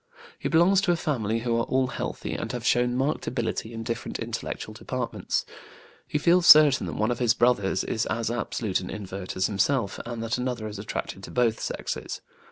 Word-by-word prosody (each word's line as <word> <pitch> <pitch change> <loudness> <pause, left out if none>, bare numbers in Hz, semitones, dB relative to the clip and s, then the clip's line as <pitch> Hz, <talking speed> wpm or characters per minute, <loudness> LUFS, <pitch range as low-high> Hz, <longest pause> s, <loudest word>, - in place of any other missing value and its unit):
He 140 - -2
belongs 175 +5 +5
to 185 - +2
a - - +3
family 115 -9 -1
who 120 -1 0
are 115 - +1
all 130 0 +1
healthy - - -4
and - - -4
have - - -4
shown 120 0 +2
marked 135 +4 -1
ability 115 -2 -2
in 115 -1 -6
different 115 0 -4
intellectual - - -5
departments. - - -3 0.6
He - - -1
feels 170 +3 +4
certain 150 -3 +8
that - - -4
one 110 +2 +1
of 120 - -2
his 120 -2 +3
brothers 110 -6 +2
is 110 - -1
as 115 -1 -1
absolute 110 -3 -1
an 90 - -7
invert 95 -2 -6
as 95 - +1
himself 105 +1 0
and 120 -1 -5
that 115 +2 -1
another 125 -3 -2
is 105 -1 -7
attracted 100 -1 -5
to - - -11
both 120 -2 +1
sexes. - - -4
120 Hz, 195 wpm, -26 LUFS, 110-130 Hz, 0.6 s, certain